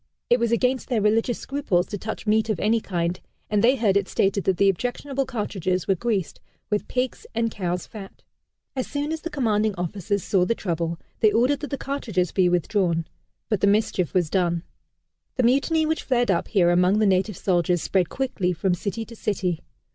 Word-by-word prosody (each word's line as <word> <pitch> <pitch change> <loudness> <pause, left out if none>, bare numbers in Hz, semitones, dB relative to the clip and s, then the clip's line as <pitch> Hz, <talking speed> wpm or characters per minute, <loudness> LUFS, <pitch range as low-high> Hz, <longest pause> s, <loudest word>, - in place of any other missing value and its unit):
It 240 - +5
was 235 -1 +1
against 250 +2 +1
their 240 -4 +2
religious 225 +3 +2
scruples 265 -11 0
to 205 - -5
touch 220 +3 -5
meat 220 +1 +2
of 210 -6 0
any 225 +2 +2
kind, 175 -2 -2 0.3
and 210 -1 +2
they 250 +3 +5
heard 215 -6 +2
it 200 -1 +2
stated 195 0 +1
that 190 -2 +2
the 200 - +4
objectionable 255 +7 -1
cartridges 190 -7 -2
were 195 - +4
greased 195 -2 -2 0.3
with 210 - 0
pig's 255 0 -2
and 230 0 +1
cow's 180 -3 -3
fat. 200 -3 -11 0.5
As 260 - -2
soon 290 +1 -2
as 320 -1 -3
the 335 - -4
commanding 220 - +1
officers 190 +3 -2
saw 190 -3 +2
the 230 +6 +1
trouble, 170 -4 -2 0.2
they 215 - +5
ordered 250 +6 +2
that 295 - -5
the 275 - -2
cartridges 220 - -2
be 185 -2 +3
withdrawn 175 -1 +1 0.4
but 210 -4 0
the 200 - +4
mischief 200 -4 +1
was 175 -4 +2
done. 175 -3 +1 0.7
The 255 - +1
Mutiny 280 +6 +3
which 315 +1 0
flared 245 -4 +1
up 170 - 0
here 175 -4 +3
among 180 +3 +3
the 215 - +3
native 195 0 +1
soldiers 175 -2 +1
spread 185 -4 +1
quickly 210 -9 -1
from 185 +2 0
city 205 +5 -3
to 230 - -12
city. 185 -6 -1
205 Hz, 195 wpm, -24 LUFS, 180-240 Hz, 0.7 s, It